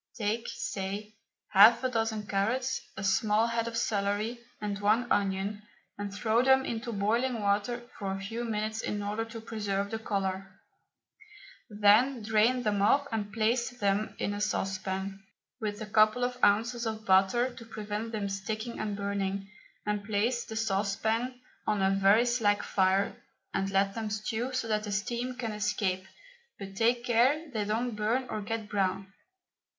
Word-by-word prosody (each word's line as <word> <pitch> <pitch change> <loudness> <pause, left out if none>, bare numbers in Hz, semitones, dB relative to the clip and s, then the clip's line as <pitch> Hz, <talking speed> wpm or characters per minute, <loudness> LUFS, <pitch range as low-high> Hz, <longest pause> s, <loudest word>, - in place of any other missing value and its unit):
Take, 220 +2 -1
say, 200 +2 -4 0.4
half 215 +5 +7
a 255 - +2
dozen 225 -3 -1
carrots, 230 +7 0 0.2
a 195 - -4
small 210 +2 +3
head 230 0 -1
of 230 0 -3
celery, 210 +1 0 0.2
and 205 -1 -3
one 215 +4 +3
onion, 200 +1 0 0.3
and 205 0 -5
throw 220 +3 +2
them 265 +1 +4
into 235 +1 -3
boiling 230 +4 0
water 210 +4 0
for 195 -2 -2
a 195 - -3
few 225 +5 -4
minutes 220 -1 -2
in 205 0 -3
order 210 +2 -1
to 225 0 -8
preserve 205 -3 -2
the 225 - -2
colour. 195 -3 -3 1.1
Then 215 +4 +4
drain 220 +4 +3
them 205 -3 +1
off 280 +8 +4
and 210 -2 -2
place 230 +3 +1
them 205 -1 0
in 205 - -1
a 205 - -4
saucepan, 195 -1 -2 0.4
with 210 -1 -3
a - - -5
couple 215 +3 +4
of 250 0 -2
ounces 235 +3 +3
of 220 0 -4
butter 195 +6 +3
to - - -10
prevent 215 0 -5
them 210 -3 -2
sticking 215 +4 -4
and 210 -2 -2
burning, 200 0 -2 0.3
and 210 -1 -1
place 220 +4 0
the 220 - -7
saucepan 220 +4 0 0.3
on 210 -2 +1
a 190 - +4
very 195 +4 +5
slack 220 -4 +2
fire 190 +1 +2 0.4
and 195 0 0
let 195 0 +2
them 220 -1 -3
stew 220 +4 -2
so 255 -3 -2
that 215 -1 0
the 205 - -4
steam 235 +5 -2
can 240 -3 -3
escape, 205 -3 -1 0.5
but 195 -1 -8
take 235 +3 +2
care 265 +7 +2
they 215 -2 -1
don't 225 +2 -1
burn 230 +5 0
or 215 - -2
get 220 +1 -4
brown. 195 -1 -1
215 Hz, 165 wpm, -30 LUFS, 200-230 Hz, 1.1 s, half